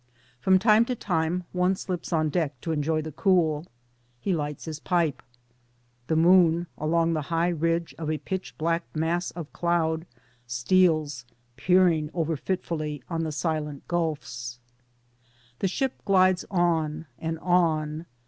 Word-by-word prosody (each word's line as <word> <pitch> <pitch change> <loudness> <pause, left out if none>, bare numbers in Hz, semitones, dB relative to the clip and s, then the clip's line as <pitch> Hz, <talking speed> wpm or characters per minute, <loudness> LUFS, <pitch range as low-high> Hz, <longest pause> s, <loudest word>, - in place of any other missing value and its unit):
From 190 +8 +4
time 215 +3 +5
to 250 - -2
time 175 -3 -1
one 180 +1 +2
slips 185 -2 -5
on 155 -2 +2
deck 145 -4 -1
to 165 - -3
enjoy 155 +1 0
the 155 -1 -7
<:ool; 170 -4 +3 0.5
He 195 - -2
h'ghts 150 -4 -2
his 155 -2 -5
pipe. 170 -4 0 0.9
The 160 - +1
moon 170 0 +5
along 165 +2 +1
the 155 - 0
high 165 +1 +2
ridge 165 0 0
of 155 -2 -3
a 155 - 0
pitch 185 +6 -5
black 165 +1 0
mass 170 +3 0
of 165 -3 -8
cloud 165 -1 0 0.4
steals, 150 +1 +2 0.3
peering 170 0 +3
over 165 -2 0
fitfully 155 -4 -3
on 165 -1 -1
the 160 - -2
silent 150 -2 -3
gulfis. 145 -8 -3 1.0
The 195 - +1
ship 265 +8 -2
glides 185 -2 +3
on 165 -4 0
and 165 0 -3
on. 160 -2 +1
165 Hz, 140 wpm, -26 LUFS, 155-180 Hz, 1.0 s, time